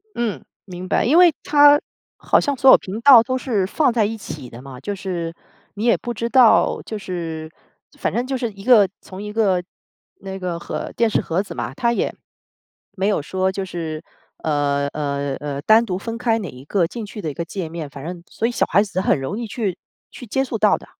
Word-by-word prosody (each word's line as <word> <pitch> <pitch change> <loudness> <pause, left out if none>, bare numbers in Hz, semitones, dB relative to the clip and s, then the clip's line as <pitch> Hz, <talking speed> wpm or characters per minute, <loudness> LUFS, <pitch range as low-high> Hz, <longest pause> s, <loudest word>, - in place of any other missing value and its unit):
嗯， 235 -4 -2 0.2
明 185 -1 -8
白， - - +2
因 285 +8 +4
为 355 -2 +7
它， 290 0 +6 0.4
好 - - +2
像 285 -2 -1
所 265 +2 +5
有 - - +9
频 195 +4 -6
道 245 -3 +8
都 255 +1 -1
是 220 -7 0
放 255 +6 +1
在 230 -2 +2
一 225 +2 -3
起 145 - -8
的 120 +2 -11
嘛。 135 -2 -10
就 205 - -4
是， 175 -4 -4 0.4
你 210 +3 -3
也 235 - +5
不 240 - -5
知 230 +1 -3
道 245 -3 +5
就 215 - -5
是， 165 -5 -5 0.5
反 - - -2
正 245 +2 -1
就 270 - -2
是 235 -3 -3
一 195 -1 -13
个 215 -5 +6
从 190 +2 -9
一 210 - -6
个， 200 -5 +1 0.6
那 195 0 -7
个 180 -2 -4
盒 - - -5
电 230 -1 +2
视 - - +1
盒 170 +3 -1
子 205 - -8
嘛。 - - -4
它 235 -3 +1
也， - - -1 0.8
没 195 0 -1
有 205 -6 +1
说 190 +5 -1
就 195 0 -4
是， 165 -4 -5 0.4
呃， 145 -2 +1
呃， 140 -2 -3
呃， 145 -1 -4
单 220 +7 +5
独 185 -3 -2
分 230 +3 -5
开 230 -2 +1
哪 190 -8 -5
一 125 +2 -12
个 175 +2 +1
进 230 +2 -6
去 210 +1 -8
的 160 -4 -3
一 - - -9
个 170 +3 -4
界 175 -1 -5
面， 160 -3 -6
反 140 0 -10
正 175 +2 -6
所 225 - -3
以 235 - +1
小 - - +1
孩 200 - +3
子 195 -3 -3
很 190 - +2
容 135 - -4
易 235 - -4
去 205 -5 -3 0.3
去 245 - -10
接 265 +5 0
触 270 - -3
到 - - +4
的。 - - -14
195 Hz, 245 characters per minute, -21 LUFS, 165-230 Hz, 0.8 s, 有